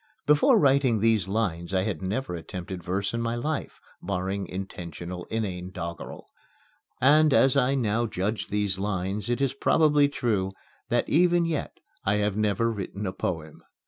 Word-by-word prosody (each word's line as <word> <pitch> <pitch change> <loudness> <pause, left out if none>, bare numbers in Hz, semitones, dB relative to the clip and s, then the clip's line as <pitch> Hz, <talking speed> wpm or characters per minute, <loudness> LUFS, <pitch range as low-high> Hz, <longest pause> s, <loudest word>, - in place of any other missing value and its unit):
Before 150 0 +5
writing 135 -5 +3
these 110 -3 +2
lines 95 -4 -1
I 95 - +2
had 95 -6 -3
never 105 +4 -2
attempted 90 +1 -6
verse 95 +4 -1
in 115 - -1
my 115 0 -1
life 145 +5 -3 0.2
barring 95 +1 -2
intentionally 90 -1 -6
inane 95 -5 -3
doggerel. 85 -2 -7 0.7
And, 150 +3 +5
as 135 -1 +5
I 130 +2 +3
now 115 -2 +1
judge 105 +2 -2
these 100 -2 -1
lines, 100 +1 -2
it 120 - 0
is 135 -2 +1
probably 145 0 +3
true 105 -9 -1 0.4
that - - +1
even 175 +1 +3
yet 160 -3 -3 0.3
I 105 - +2
have 105 -1 0
never 110 +2 +1
written 100 -1 -5
a 95 - -2
poem. 80 -3 -4
105 Hz, 155 wpm, -26 LUFS, 95-125 Hz, 0.7 s, Before